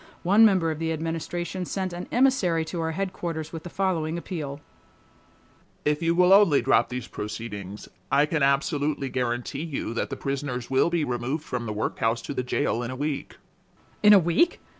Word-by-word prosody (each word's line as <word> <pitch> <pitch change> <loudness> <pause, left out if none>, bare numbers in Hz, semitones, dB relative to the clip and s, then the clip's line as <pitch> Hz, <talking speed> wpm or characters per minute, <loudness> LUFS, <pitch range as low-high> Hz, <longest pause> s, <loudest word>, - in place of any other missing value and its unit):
One 200 +5 +5
member 185 -7 +4
of 155 - -5
the 165 0 -1
Administration 165 +3 -3
sent 185 0 -3
an 175 +1 -6
emissary 230 -11 +2
to 165 +1 -4
our 160 - -1
headquarters 170 -4 -4
with 165 - -5
the 175 - -8
following 170 -4 -1
appeal: 150 -5 -5 1.3
"If 150 +2 +1
you 165 0 +2
will 180 +1 +6
only 195 -8 +6
drop - - +3
these 125 0 -5
proceedings, 105 -2 -6 0.2
I 145 - +5
can 155 0 -1
absolutely 140 0 +1
guarantee 125 +2 -2
you 155 -7 -4
that 115 - -2
the 135 - -5
prisoners 135 -3 -4
will 135 +5 +3
be 170 -2 0
removed 125 +4 -2
from 125 -5 -4
the - - -2
workhouse 115 +2 -1
to - - -5
the 130 - -1
jail 120 -1 -1
in 120 - -4
a 130 - -5
week:" 145 +1 -4 0.6
"In 210 - +7
a 205 - +10
week? 175 - +2
155 Hz, 180 wpm, -26 LUFS, 130-175 Hz, 1.3 s, a